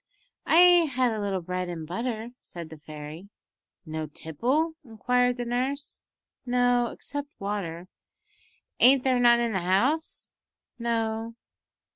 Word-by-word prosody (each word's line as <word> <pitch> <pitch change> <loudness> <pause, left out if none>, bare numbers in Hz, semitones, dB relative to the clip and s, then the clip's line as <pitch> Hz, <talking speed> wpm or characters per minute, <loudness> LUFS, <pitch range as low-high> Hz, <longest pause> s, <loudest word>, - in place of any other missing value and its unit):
"I 350 0 +7
had 250 -2 +3
a 220 - -3
little 195 -3 -2
bread 180 +1 -3
and 165 -2 -5
butter," 230 +6 -4
said 170 -2 -8
the 160 - -10
fairy. 155 +5 -9 0.6
"No 155 -1 -4
tipple?" 250 - -1
inquired 245 +1 +1
the 245 - -3
nurse. 260 +4 -3 0.4
"No, 245 -1 +2
except 285 +4 -6
water." 185 -4 -4 0.9
"Ain't 260 +1 +6
there 255 -2 +2
none 240 -1 +6
in 235 -1 0
the 190 - 0
house?" 235 - 0 0.5
"No." 225 -1 -2
230 Hz, 125 wpm, -27 LUFS, 180-250 Hz, 0.9 s, I